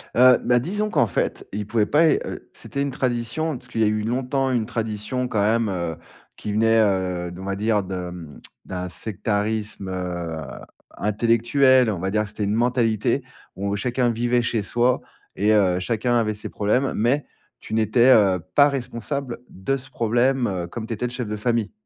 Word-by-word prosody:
Heu, 125 Hz, +1 st, +7 dB
ben 120 Hz, 0 st, +3 dB
disons 205 Hz, -, -2 dB
qu'en 120 Hz, -, +2 dB
fait, 85 Hz, -, -2 dB
il 105 Hz, 0 st, -3 dB
pouvait 110 Hz, -1 st, +1 dB
pas 160 Hz, +6 st, +4 dB
il -, -, +3 dB
heu, -, -, -7 dB
c'était 140 Hz, -, -5 dB
une 140 Hz, -1 st, -1 dB
tradition 125 Hz, +4 st, -1 dB
parce 125 Hz, -, -16 dB
qu'il 115 Hz, -, -4 dB
y -, -, +5 dB
a -, -, +3 dB
eu 105 Hz, 0 st, 0 dB
longtemps 130 Hz, +3 st, 0 dB
une 115 Hz, -3 st, +1 dB
tradition 115 Hz, +2 st, -3 dB
quand 105 Hz, -, 0 dB
même, 110 Hz, +1 st, +2 dB
heu, 85 Hz, -3 st, -2 dB, 0.4 s
qui 105 Hz, -, -5 dB
venait, 115 Hz, +1 st, +3 dB
heu 90 Hz, -3 st, 0 dB
d 90 Hz, -, -10 dB
on 95 Hz, -, -7 dB
va 100 Hz, 0 st, -2 dB
dire 105 Hz, -1 st, +1 dB
de 90 Hz, -1 st, -5 dB, 0.5 s
d'un 90 Hz, 0 st, -4 dB
sectarisme, 105 Hz, 0 st, -3 dB
heu, 90 Hz, -3 st, -4 dB, 0.6 s
intellectuel, 115 Hz, +4 st, +3 dB
on 95 Hz, -5 st, -2 dB
va 95 Hz, +2 st, -2 dB
dire 105 Hz, 0 st, +1 dB
que -, -, -6 dB
c'était 105 Hz, -, -4 dB
une 100 Hz, +1 st, 0 dB
mentalité 120 Hz, +1 st, +1 dB, 0.3 s
où 100 Hz, +1 st, -2 dB
chacun 125 Hz, +2 st, 0 dB
vivait 120 Hz, +1 st, +1 dB
chez 115 Hz, -3 st, -1 dB
soi 120 Hz, +4 st, +1 dB, 0.4 s
et 105 Hz, +2 st, +3 dB
heu, 95 Hz, -4 st, +3 dB
chacun 120 Hz, +4 st, 0 dB
avait 110 Hz, -2 st, +1 dB
ses 105 Hz, -, -7 dB
problèmes. 125 Hz, +6 st, +1 dB
Mais 125 Hz, +7 st, +1 dB, 0.4 s
tu 110 Hz, -, -8 dB
n'étais, 110 Hz, +4 st, +4 dB
heu, 95 Hz, -4 st, +4 dB
pas 145 Hz, -, +7 dB
responsable 125 Hz, 0 st, -4 dB
de 115 Hz, +9 st, -2 dB
ce 130 Hz, 0 st, -12 dB
problème, 120 Hz, +3 st, +1 dB
heu, 90 Hz, -3 st, -3 dB
comme 110 Hz, +5 st, -6 dB
tu 115 Hz, -, -3 dB
étais 115 Hz, -, -3 dB
le -, -, -7 dB
chef 125 Hz, -3 st, -4 dB
de 105 Hz, 0 st, -3 dB
famille. 115 Hz, -1 st, 0 dB
115 Hz, 195 wpm, -23 LUFS, 100-125 Hz, 0.6 s, Heu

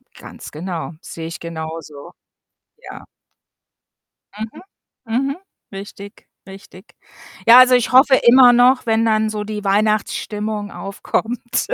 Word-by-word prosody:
Ganz -, -, -12 dB
genau, 170 Hz, +1 st, -6 dB
sehe 165 Hz, -1 st, -8 dB
ich 165 Hz, -, -8 dB
genauso. 160 Hz, -2 st, -8 dB, 0.8 s
Ja. -, -, -12 dB, 1.3 s
Mhm, 220 Hz, +1 st, -8 dB, 0.4 s
mhm, 265 Hz, +5 st, -2 dB, 0.4 s
richtig, 200 Hz, 0 st, -11 dB, 0.2 s
richtig. 195 Hz, +1 st, -15 dB, 0.5 s
Ja, 235 Hz, +2 st, +9 dB
also 255 Hz, 0 st, +6 dB
ich 245 Hz, -, 0 dB
hoffe 265 Hz, +1 st, +6 dB
immer 250 Hz, 0 st, +6 dB
noch, 250 Hz, +2 st, +3 dB
wenn 225 Hz, 0 st, +1 dB
dann 220 Hz, -1 st, +1 dB
so 210 Hz, -1 st, -4 dB
die 210 Hz, 0 st, -6 dB
Weihnachtsstimmung 210 Hz, 0 st, -2 dB
aufkommt, 220 Hz, +6 st, -4 dB
215 Hz, 110 wpm, -18 LUFS, 190-240 Hz, 1.3 s, Ja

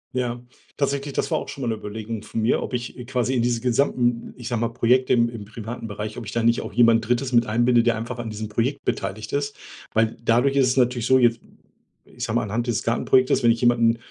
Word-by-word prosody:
Ja, 120 Hz, -1 st, -1 dB, 0.4 s
tatsächlich, 140 Hz, 0 st, -1 dB
das -, -, -1 dB
war -, -, +2 dB
auch -, -, -8 dB
schon 135 Hz, -, -6 dB
mal 120 Hz, -, -1 dB
'ne -, -, +1 dB
Überlegung 110 Hz, +1 st, -6 dB
von 110 Hz, -, -5 dB
mir, 110 Hz, +1 st, +2 dB
ob -, -, -4 dB
ich, 120 Hz, 0 st, -5 dB
äh, -, -, -6 dB
quasi 125 Hz, 0 st, -1 dB
in 125 Hz, -, +1 dB
diese 120 Hz, -1 st, 0 dB
gesamten, 120 Hz, -1 st, 0 dB
ich 120 Hz, -2 st, -8 dB
sage 120 Hz, -2 st, -1 dB
mal: 115 Hz, -, +2 dB
„Projekte 125 Hz, +2 st, +2 dB
im 120 Hz, -1 st, +4 dB
im 115 Hz, -3 st, -7 dB
privaten 115 Hz, +2 st, -7 dB
Bereich“, 105 Hz, +1 st, -6 dB
ob 115 Hz, -, -8 dB
ich -, -, -5 dB
da 115 Hz, -, -1 dB
nicht 115 Hz, +1 st, +3 dB
auch -, -, -7 dB
jemand 115 Hz, -2 st, +4 dB
3. 125 Hz, +2 st, 0 dB
mit 120 Hz, -1 st, +4 dB
einbinde, 120 Hz, +2 st, +3 dB
der 120 Hz, -1 st, +2 dB
einfach 120 Hz, +2 st, -5 dB
an 115 Hz, -, -4 dB
diesem 110 Hz, 0 st, -5 dB
Projekt 120 Hz, +6 st, -2 dB
beteiligt 110 Hz, +4 st, -3 dB
ist. 145 Hz, 0 st, -1 dB, 0.4 s
Weil 110 Hz, 0 st, +1 dB
dadurch 125 Hz, +4 st, +3 dB
ist 135 Hz, -2 st, +4 dB
es 125 Hz, -, 0 dB
natürlich 125 Hz, -2 st, +2 dB
so, 130 Hz, -, +5 dB
jetzt, 120 Hz, -2 st, +3 dB, 0.7 s
ich -, -, -9 dB
sage -, -, -3 dB
mal: -, -, +2 dB
„Anhand 115 Hz, +4 st, -2 dB
dieses 115 Hz, -4 st, -1 dB
Gartenprojektes“, 130 Hz, +2 st, +2 dB
wenn 120 Hz, -, +4 dB
ich 115 Hz, +1 st, -1 dB
jemanden 115 Hz, -1 st, +3 dB
120 Hz, 245 wpm, -23 LUFS, 115-125 Hz, 0.7 s, so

